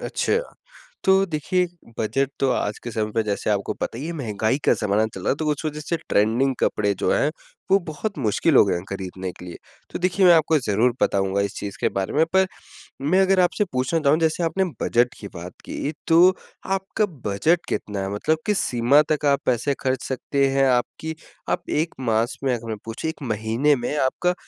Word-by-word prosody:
अच्छा। 450 - 0 0.7
तो 190 0 +4
देखिए 180 +2 0 0.3
बजट 130 +5 0
तो 135 - +2
आज 105 -3 -1
के 120 - -5
समय 110 -1 -2
में 115 - +3
जैसे 105 0 -2
आपको 100 -1 0
पता - - -4
ही 135 - -5
है 170 - -4
महँगाई 110 -4 -1
का - - +5
जमाना 105 +1 +2
चल 95 -4 -9
रहा - - -1
है - - +2
तो 155 - -4
उस 150 +2 -4
वजह 150 0 -3
से 165 +3 -2
ट्रेंडिंग 120 +6 +2
कपड़े 100 -1 +1
जो - - +1
हैं - - +2 0.4
वो 195 - +6
बहुत 195 +6 -4
मुश्किल 135 +5 +1
हो - - +8
गए 100 - +1
हैं 85 - -4
खरीदने 95 -1 -5
के 90 - -13
लिए। 85 - -8 0.3
तो - - -4
देखिए 185 +2 +2
मैं 175 - +8
आपको 160 -1 +4
ज़रूर 115 +2 +1
बताऊँगा 95 0 +1
इस 100 -1 -3
चीज़ 100 -1 -6
के - - +2
बारे 95 0 -2
में 155 +2 +4
पर 190 0 +4 0.5
मैं 180 +8 +3
अगर 190 0 +3
आपसे 180 +3 +2
पूछना 130 +6 0
चाहूँ 150 0 +3
जैसे 165 +1 +1
आपने 165 +4 +1 0.2
बजट 120 +1 +2
की 100 - -7
बात 85 +1 -7
की 150 - -4
तो 175 +3 +6 0.3
आपका 195 +2 0 0.2
बजट 160 - +1
कितना 105 -2 -3
है 95 - -3
मतलब 155 +10 +1
किस 210 -2 +1
सीमा 125 +4 +4
तक 150 -1 0
आप 140 -1 +3
पैसे 130 +3 +1
खर्च 130 -1 -1
सकते 135 +1 0
हैं 135 0 +3
आपकी 130 +6 -1 0.3
आप - - -2
1 160 +2 -1
मास 115 +2 +1
में 130 - +2
अगर 115 -1 -8
मैं 110 - -3
पूछे 115 +8 -4
1 160 - -8
महीने 115 +7 +2
में 125 +3 -3
आपका 165 +7 +1
135 Hz, 210 wpm, -23 LUFS, 110-160 Hz, 0.7 s, हो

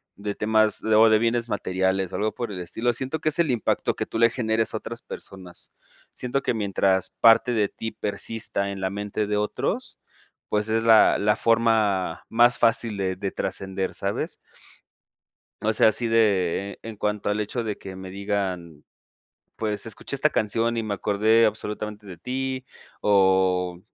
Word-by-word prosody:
de 100 0 -5
temas 110 0 +2
o 110 +1 +5
de 110 - +5
bienes 115 +1 0
materiales 95 -1 -1
o - - -3
algo 110 +1 -1
por 120 -3 -4
el 95 - -5
estilo, 115 +7 -1
siento 130 +6 -3
que 155 - +1
es 155 - -4
el 170 -4 +3
impacto 120 -4 0
que - - -3
tú 115 - -4
le 115 0 +6
generes 115 -2 -1
a - - -1
otras 115 +2 -7
personas. 90 -2 -9 0.4
Siento 130 +2 -2
que - - 0
mientras 95 -3 +1
parte 115 +2 +6
de 105 -3 +2
ti 110 - -6
persista 105 -1 -3
en 100 -1 -5
la 95 0 -2
mente 105 +1 -3
de 105 0 -1
otros, 105 0 -2 0.5
pues 105 +1 0
es 115 +1 +1
la 115 -1 +6
la 105 0 +2
forma 110 -7 +1
más 120 +2 +4
fácil 115 -1 +2
de 95 -2 -1
de 95 +1 -4
trascender, 95 0 -3
¿sabes? - - -3 1.2
O 110 +1 0
sea, 110 - +5
así 115 +2 -1
de 100 -4 +1
en 115 -1 -8
cuanto 105 0 -1
al 105 +1 0
hecho 110 +3 -2
de 105 -2 -3
que 95 -1 -9
me 95 0 -8
digan: 95 -5 -3 0.7
"Pues 105 -2 -2
escuché 115 +5 -5
esta 155 +3 +3
canción 115 +2 0
y 115 - 0
me 110 -2 -2
acordé 110 +3 +3
absolutamente 105 0 -4
de 90 -3 -9
ti", 130 +6 -3 0.4
o, 95 -3 +2
105 Hz, 175 wpm, -24 LUFS, 95-115 Hz, 1.2 s, le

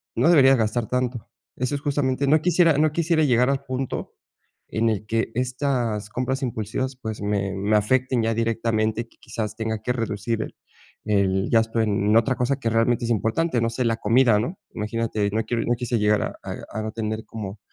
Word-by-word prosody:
no - - +3
deberías 135 -5 +6
gastar 110 0 0
tanto, 125 -2 -2 0.3
eso 125 +2 -2
es 140 - -1
justamente, 140 -2 0
no 155 +2 +4
quisiera 170 -2 +4
no 155 0 +3
quisiera 160 0 +1
llegar 125 -2 +3
al 140 0 0
punto 130 -1 -4 0.5
en 115 +1 +1
el 110 -1 -2
que 115 +1 -1
estas 125 -4 -1
compras 130 +4 -2
impulsivas, 120 +2 -3
pues, 110 -2 -5
me 100 -1 -1
me 100 +3 +1
afecten 130 +3 +1
ya 115 0 +1
directamente 115 -1 0
y - - -4
que 115 - -28
quizás 110 -2 -4
tenga 110 -1 -3
que 125 +3 -1
reducir 115 -1 -2
el - - -9 0.5
el 100 -2 +1
gasto 115 0 +2
en 105 -1 +1
otra 130 +3 +2
cosa 130 +3 0
que 115 - -1
realmente 115 +1 +2
es 120 - -1
importante, 120 - +1
no 115 - +1
sé, 125 +2 -1
la 115 -1 +1
comida, 115 +1 +4
¿no? 130 - -4 0.2
Imagínate, 110 -1 -1
no 110 +2 0
quiero 115 0 -1
no 120 - +1
quise 120 0 -1
llegar 105 0 +3
a - - -5
a - - -5 0.2
a 110 - -2
no 110 - -3
tener 110 0 -3
como 105 -2 -7
115 Hz, 200 wpm, -24 LUFS, 110-130 Hz, 0.5 s, deberías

